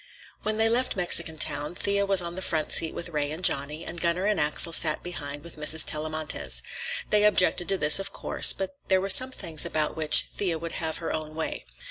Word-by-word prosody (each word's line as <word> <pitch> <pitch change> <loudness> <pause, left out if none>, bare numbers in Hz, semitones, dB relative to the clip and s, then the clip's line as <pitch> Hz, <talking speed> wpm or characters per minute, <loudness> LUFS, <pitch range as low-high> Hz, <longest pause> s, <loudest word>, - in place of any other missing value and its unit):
When 215 0 -1
they 220 0 +3
left 245 +3 0
Mexican 170 -3 0
Town, 150 +1 -1
Thea 200 +1 -1
was 195 -2 +1
on 170 0 -5
the 185 - -7
front 160 -4 -2
seat 160 - +3
with 170 - -2
Ray 150 -3 -2
and 160 +4 -7
Johnny, 150 +1 0
and 170 - -3
Gunner 175 +2 0
and 210 0 0
Axel 150 +3 +2
sat 155 -2 +2
behind 145 -5 -7
with 170 - -6
Mrs. 155 +1 +1
Tellamantez. 155 0 -1 0.5
They 210 0 +4
objected 185 -3 +2
to 195 - 0
this, 150 +1 +4
of 195 - -6
course, - - +3
but 190 -1 -5
there 190 -1 +3
were 195 +1 -4
some 255 +7 +7
things 170 - -2
about 155 -1 -1
which 155 -1 +5
Thea 180 -5 -3
would 165 +1 -7
have 160 -1 -3
her 165 - -5
own 155 -1 -5
way. 160 - -4
170 Hz, 215 wpm, -26 LUFS, 155-190 Hz, 0.5 s, some